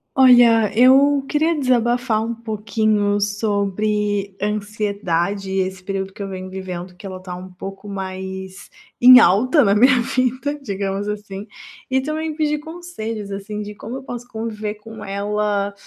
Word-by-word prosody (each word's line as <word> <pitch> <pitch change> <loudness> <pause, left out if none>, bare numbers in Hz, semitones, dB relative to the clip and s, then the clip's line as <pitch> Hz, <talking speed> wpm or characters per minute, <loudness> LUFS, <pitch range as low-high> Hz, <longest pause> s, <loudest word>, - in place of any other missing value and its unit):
Olha, 240 -5 +6
eu 275 +2 +5
queria 315 +3 +1
desabafar 240 -3 +1
um 230 +1 -3
pouquinho 215 -2 0
sobre 205 -1 -1
ansiedade 200 -2 -2
e 190 0 0
esse 185 0 -3
período 195 0 -4
que 200 - -8
eu 200 - -4
venho 185 -1 -7
vivendo, 185 -1 -6
que 180 - -11
ela 185 -1 -6
tá 185 -1 -8
um 185 +1 -9
pouco 195 +2 -9
mais 190 -1 -6 0.3
em 255 +1 +10
alta 255 - +4
na 200 -1 +3
minha 255 +4 +5
vida, 260 +4 -1
digamos 200 -3 -3
assim. 205 -1 -6 0.4
E 265 0 +2
também 310 +1 -3
pedir 300 -1 0
conselhos, 295 -11 -7
assim, 210 +2 -5
de 210 0 -7
como 225 +5 -7
eu 270 - -7
posso 245 -2 -8
conviver 220 -2 -4
com 220 +1 -11
ela 205 0 -1
210 Hz, 150 wpm, -20 LUFS, 195-245 Hz, 0.4 s, em